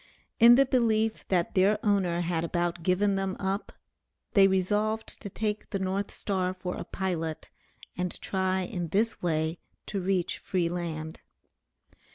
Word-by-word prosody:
In 235 +1 +9
the 275 +2 +5
belief 225 -4 +1
that 175 -3 +1
their 200 +2 +4
owner 185 -4 +2
had 170 -1 -1
about 175 0 -1
given 195 +3 +2
them 195 -1 -2
up 195 +2 -2 0.6
they 195 -1 +7
resolved 210 +4 0
to 200 - -5
take 210 +1 -3
the 195 - -1
North 190 +1 -1
Star 185 -2 -2
for 180 -1 -4
a - - -5
pilot, 165 -4 -3 0.4
and 180 0 -3
try 190 -1 0
in 175 -1 -3
this 215 +7 0
way 160 -1 0 0.3
to 200 -2 -3
reach 185 -1 0
free 175 -3 0
land. 160 -2 -4
190 Hz, 150 wpm, -28 LUFS, 175-205 Hz, 0.6 s, In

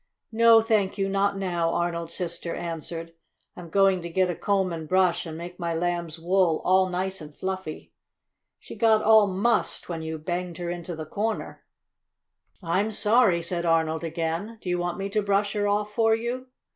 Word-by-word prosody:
"No, 230 0 +6
thank 215 -3 +1
you, 195 -1 0
not 195 0 +1
now," 175 -3 0
Arnold's 170 -1 -2
sister 170 -1 -3
answered. 165 0 -5 0.4
"I'm 175 -2 -10
going 195 0 +3
to 170 - -6
get 185 +1 +1
a - - -5
comb 190 -2 0
and 160 -2 -6
brush 185 -2 +2
and 160 -1 -6
make 175 +2 -8
my 170 -1 -2
Lamb's 170 -1 -2
wool 175 -1 +2
all 185 0 +4
nice 185 +1 -3
and 150 -1 -11
fluffy. 190 -4 -5 0.6
She - - -11
got 220 -2 +3
all 220 -1 +6
mussed 200 +3 0
when 165 -2 -4
you 160 0 -4
banged 175 +2 -4
her 175 -1 -3
into 175 0 -5
the 155 0 -6
corner." 215 +7 -3 1.0
"I'm 185 +6 +1
sorry," 210 -4 +3
said 170 0 -1
Arnold 160 -1 +1
again. 165 +6 -3
"Do 185 - -6
you 175 0 0
want 175 0 -2
me 195 0 -3
to 210 +1 0
brush 200 0 +1
her 205 -1 0
off 210 +1 0
for 225 0 +3
you?" 245 +3 -4
180 Hz, 185 wpm, -26 LUFS, 170-205 Hz, 1.0 s, No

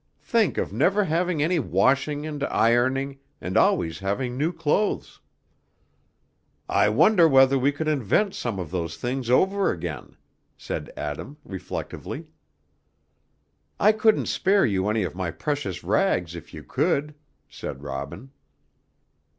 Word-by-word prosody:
Think 225 -4 +1
of - - -2
never 185 - +3
having 170 -2 0
any 170 +2 +1
washing 140 - +1
and 150 -2 -4
ironing, 130 +4 +1 0.2
and - - -5
always 80 0 +2
having 120 +6 -2
new 150 +6 0
clothes." 165 +5 -1 1.5
"I - - +3
wonder 185 -6 +5
whether 135 -2 +5
we 135 +3 +3
could 155 +2 -4
invent 155 - +1
some 115 -5 -3
of 90 -4 -5
those 85 -3 -3
things 125 0 -3
over 195 +9 +3
again," 80 -5 -5 0.4
said - - -5
Adam, 75 - -5
reflectively. 95 -2 -6 1.5
"I 210 - +6
couldn't 220 0 +2
spare 195 +1 +2
you 100 -3 0
any 110 -1 +1
of 90 - -3
my 90 -1 -3
precious 145 - -3
rags, 90 - +1
if 85 - -10
you - - -9
could," 150 +2 0 0.3
said 70 +1 -8
Robin. 70 - -6
135 Hz, 130 wpm, -25 LUFS, 95-160 Hz, 1.5 s, I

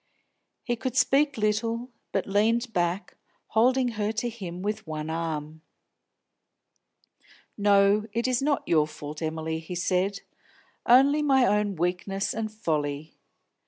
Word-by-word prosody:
He 240 - -1
could 255 +2 -4
speak 285 0 +3
little, 225 +3 -1 0.2
but - - -1
leaned 225 +4 +1
back, 175 +2 -1 0.3
holding 250 +3 +3
her 215 -2 -2
to 225 +2 -2
him 185 -6 -7
with 210 -1 -3
one 155 0 -4
arm. 160 -1 -4 1.9
"No, 205 +1 +3
it 235 +3 -1
is 255 -1 +1
not 285 0 0
your 155 -3 +3
fault, 150 0 -8
Emily," 160 0 -3
he 165 +2 -7
said. 185 +3 0 0.7
"Only 275 +5 +6
my 270 -3 +4
own 210 -1 +1
weakness 180 +3 -1
and 220 -1 -3
folly. 155 -7 -2
205 Hz, 125 wpm, -26 LUFS, 170-235 Hz, 1.9 s, Only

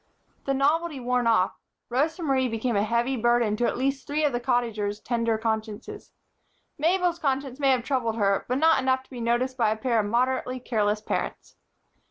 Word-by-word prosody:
The 275 - 0
novelty 300 +2 +1
worn 250 -1 0
off, 220 -5 +2 0.3
Rosa 310 +8 0
Marie 265 -3 +2
became 225 0 -2
a 200 - +3
heavy 235 +4 0
burden 240 -2 +2
to 240 - +1
at - - -2
least 270 +1 -1
three 300 +1 0
of 285 - +1
the 240 - 0
Cottagers' 230 -5 -1
tender 230 -1 0
consciences. 220 0 -4 0.7
Mabel's 345 +2 +1
conscience 270 -2 -2
may 275 -1 +3
have 255 -3 +2
troubled 250 -4 -1
her, 200 -3 +1
but 250 - +1
not 320 0 +4
enough 260 0 +1
to - - -29
be 245 -2 -7
noticed 240 +3 0
by 225 -4 +3
a 215 - -1
pair 235 0 +1
of 205 - 0
moderately 255 +2 0
careless 210 -3 0
parents. - - -4
245 Hz, 190 wpm, -26 LUFS, 225-270 Hz, 0.7 s, not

